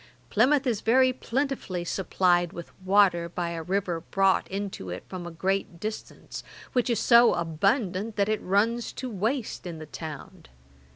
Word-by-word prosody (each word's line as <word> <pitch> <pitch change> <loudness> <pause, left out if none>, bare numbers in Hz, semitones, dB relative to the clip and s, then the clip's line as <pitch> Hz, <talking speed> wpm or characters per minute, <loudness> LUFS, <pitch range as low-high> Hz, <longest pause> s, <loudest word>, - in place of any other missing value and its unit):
Plymouth 270 +5 +3
is 230 -5 0
very 255 +3 +4
plentifully 250 -9 -2
supplied 175 -1 +1
with 170 - -8
water 185 -3 +3
by 170 0 -3
a 165 -1 -4
river 180 -1 -1
brought 195 +3 +1
into 195 - -5
it 90 - -6
from 180 -2 -6
a - - -4
great 185 +1 -2
distance, 215 +3 -6 0.3
which 250 -1 +1
is 235 -3 +1
so 235 0 +6
abundant 195 - 0
that 200 -1 +1
it 215 0 0
runs 225 +5 +1
to 255 -2 -5
waste 220 +1 -2
in 170 -2 -6
the 155 - -8
town. 160 +4 -9
195 Hz, 160 wpm, -27 LUFS, 175-230 Hz, 0.3 s, so